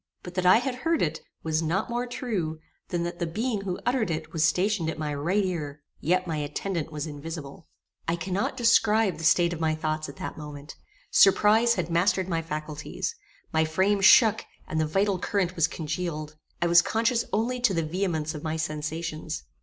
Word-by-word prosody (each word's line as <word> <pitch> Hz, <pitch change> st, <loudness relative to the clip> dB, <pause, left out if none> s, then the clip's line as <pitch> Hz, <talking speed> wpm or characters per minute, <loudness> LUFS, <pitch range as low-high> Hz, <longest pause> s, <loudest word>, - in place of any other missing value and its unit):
But 180 Hz, -, -8 dB
that 185 Hz, -1 st, +1 dB
I 185 Hz, -, +8 dB
had 250 Hz, +1 st, -2 dB
heard 325 Hz, +5 st, +1 dB
it, 160 Hz, -1 st, -2 dB, 0.2 s
was 160 Hz, 0 st, 0 dB
not 170 Hz, +6 st, 0 dB
more 240 Hz, +1 st, -1 dB
true 205 Hz, -, -3 dB, 0.3 s
than 175 Hz, -1 st, -2 dB
that 175 Hz, 0 st, -4 dB
the 170 Hz, -, -1 dB
being 215 Hz, +5 st, -2 dB
who 185 Hz, -2 st, -3 dB
uttered 245 Hz, -4 st, +1 dB
it 155 Hz, -1 st, -4 dB
was 160 Hz, -2 st, +1 dB
stationed 180 Hz, +1 st, +2 dB
at -, -, -4 dB
my 150 Hz, -2 st, -3 dB
right 175 Hz, +8 st, 0 dB
ear; 150 Hz, -5 st, -4 dB, 0.2 s
yet 185 Hz, +3 st, +1 dB
my 165 Hz, -3 st, -2 dB
attendant 155 Hz, +3 st, -3 dB
was 150 Hz, -1 st, -4 dB
invisible. 155 Hz, 0 st, -8 dB, 0.4 s
I 165 Hz, -, +1 dB
cannot 185 Hz, +7 st, -2 dB
describe 225 Hz, -5 st, +3 dB
the -, -, -6 dB
state 170 Hz, +2 st, +4 dB
of 165 Hz, -, -6 dB
my 160 Hz, -1 st, +1 dB
thoughts 155 Hz, -1 st, -2 dB
at 140 Hz, -, -10 dB
that -, -, -6 dB
moment. 145 Hz, -1 st, -9 dB, 0.4 s
Surprize 215 Hz, +4 st, +5 dB
had 175 Hz, -2 st, -2 dB
mastered 185 Hz, +2 st, +2 dB
my 165 Hz, -3 st, -1 dB
faculties. 155 Hz, -, -4 dB, 0.4 s
My 160 Hz, 0 st, +3 dB
frame 190 Hz, +6 st, +1 dB
shook, 220 Hz, +2 st, +6 dB, 0.2 s
and 160 Hz, -, -1 dB
the 155 Hz, -, +1 dB
vital 195 Hz, +4 st, +1 dB
current 185 Hz, -2 st, -1 dB
was 165 Hz, -2 st, +3 dB
congealed. 155 Hz, -1 st, -4 dB, 0.3 s
I -, -, +2 dB
was 170 Hz, 0 st, +7 dB
conscious 230 Hz, +4 st, +1 dB
only 240 Hz, +4 st, 0 dB
to 245 Hz, -4 st, +3 dB
the 165 Hz, -, +1 dB
vehemence 160 Hz, -2 st, -1 dB
of 150 Hz, -, -6 dB
my 160 Hz, +1 st, -2 dB
sensations. 155 Hz, -, -4 dB
170 Hz, 195 wpm, -27 LUFS, 155-200 Hz, 0.4 s, I